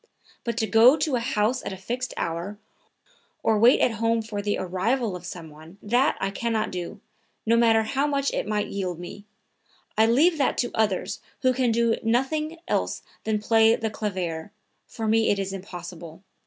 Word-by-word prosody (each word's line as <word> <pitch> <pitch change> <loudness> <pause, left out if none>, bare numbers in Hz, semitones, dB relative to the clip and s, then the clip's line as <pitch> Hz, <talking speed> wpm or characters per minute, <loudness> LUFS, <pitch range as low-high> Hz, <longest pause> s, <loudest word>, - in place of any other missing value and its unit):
But 235 -1 -3
to 225 - +1
go 225 +7 +6
to 305 -3 0
a - - +1
house 235 0 0
at - - -4
a 190 - -6
fixed 245 +6 -4
hour, 170 +5 -3 0.9
or 220 -1 +3
wait 240 +4 +6
at - - +4
home 230 0 +2
for 210 -2 -4
the 205 0 -1
arrival 195 +4 -1
of 180 0 -8
some 165 -4 -8
one, 160 +5 -14
that 245 +6 +2
I 195 - -1
can 235 +4 -2
not 220 -1 0
do, 180 -2 -5 0.5
no 230 +1 +4
matter 225 -1 +4
how 275 +6 0
much 280 -1 0
it - - -2
might 210 -1 0
yield 185 -4 -3
me; 190 +3 -9 0.7
I 220 +1 +4
leave 305 +8 +4
that 275 - +1
to 240 - 0
others 210 -4 0 0.2
who 255 0 +4
can 250 -2 +1
do 230 0 +2
nothing 305 +8 0
else - - -1 0.2
than 215 -1 0
play 225 +1 +4
the 220 -1 -3
clavier, 185 -5 -4 0.4
for 225 -1 -5
me 225 +1 +3
it 205 - +2
is 195 0 -3
impossible. 175 -2 -9
220 Hz, 190 wpm, -25 LUFS, 190-240 Hz, 0.9 s, go